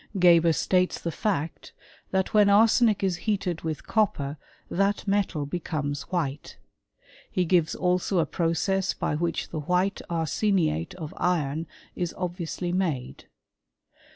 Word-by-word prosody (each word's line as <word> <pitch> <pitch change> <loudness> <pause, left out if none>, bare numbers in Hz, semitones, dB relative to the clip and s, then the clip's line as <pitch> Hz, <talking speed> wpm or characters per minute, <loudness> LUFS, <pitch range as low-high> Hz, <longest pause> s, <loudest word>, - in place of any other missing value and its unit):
Geber 170 -2 +6
states 185 +3 +1
the 170 - -3
fact, 165 -5 -3 0.4
that 190 0 0
when 210 -1 +6
arsenic 220 +1 +4
is 185 -3 +1
heated 185 -5 -1
with 160 -2 -4
copper 150 -10 0 0.3
that 200 +3 0
metal 195 -7 0
becomes 145 -2 -3
white.f 150 -6 -3 0.7
He 185 - 0
gives 170 -2 +2
also 180 +1 +1
a 165 - +3
process 185 +3 0
by - - -1
which 165 +2 -2
the 160 - -4
white 180 +6 0
arseniate 165 - 0
of 160 -4 -7
iron 160 -3 0 0.3
is 175 -2 -3
obviously 175 -1 -3
made. 165 -9 -2
175 Hz, 125 wpm, -26 LUFS, 160-190 Hz, 0.7 s, Geber